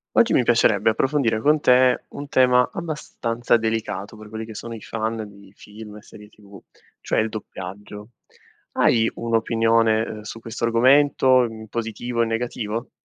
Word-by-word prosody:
Oggi 235 - +4
mi 125 - +4
piacerebbe 110 -3 +3
approfondire 125 -2 0
con 150 +5 +3
te 125 -1 +4
un 145 0 -9
tema 125 -2 +3
abbastanza 125 -8 -2
delicato 110 -3 -3
per 110 0 -12
quelli 110 +1 -6
che 110 0 -10
sono 115 +2 -7
i 110 - -9
fan 110 0 -4
di 100 -1 -17
film 105 0 -12
e 105 - -12
serie 105 0 -15
tv, 100 -2 -16 0.4
cioè - - 0
il 110 +1 -1
doppiaggio. 105 +1 -9 0.6
Hai 115 -1 +2
un'opinione, 115 -1 +1
uhm, 110 -1 -6
su 105 +2 -8
questo 115 0 -6
argomento, 130 +2 +4
in 110 -1 -7
positivo 115 +1 -4
o - - +5
in - - -4
negativo? 115 0 -4
115 Hz, 160 wpm, -22 LUFS, 110-120 Hz, 0.6 s, o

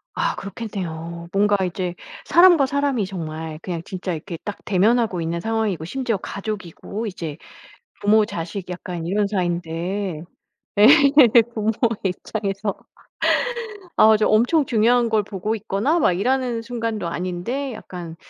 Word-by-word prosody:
아 - - 0
그렇겠네요. 170 -5 -6
뭔가 205 +1 +3
이제 180 0 -3 0.3
사람과 345 -5 +6
사람이 275 -6 0
정말 160 -4 -6
그냥 170 -3 -4
진짜 185 -1 -4
이렇게 165 +2 -6
딱 205 - -5
대면하고 210 -1 +2
있는 165 +1 -2
상황이고 220 -6 -1
심지어 245 +3 -1
가족이고 205 +2 -6
이제 165 -6 -6 0.6
부모 210 +1 +4
자식 180 +1 -6
약간 175 -2 -5
이런 200 +3 +1
사이인데 175 -1 -2 0.6
예. 210 - +9 0.7
부모의 220 0 0 0.3
입장에서 195 +2 -2 1.2
아주 215 0 +6
엄청 245 +8 +3
중요한 235 +1 +3
걸 220 -1 +3
보고 205 +2 -3
있거나 220 - 0
막 285 - +3
일하는 240 +4 0
순간도 230 -6 -3
아닌데 185 +11 -3
약간 175 -6 -8
200 Hz, 295 characters per minute, -22 LUFS, 175-225 Hz, 1.2 s, 예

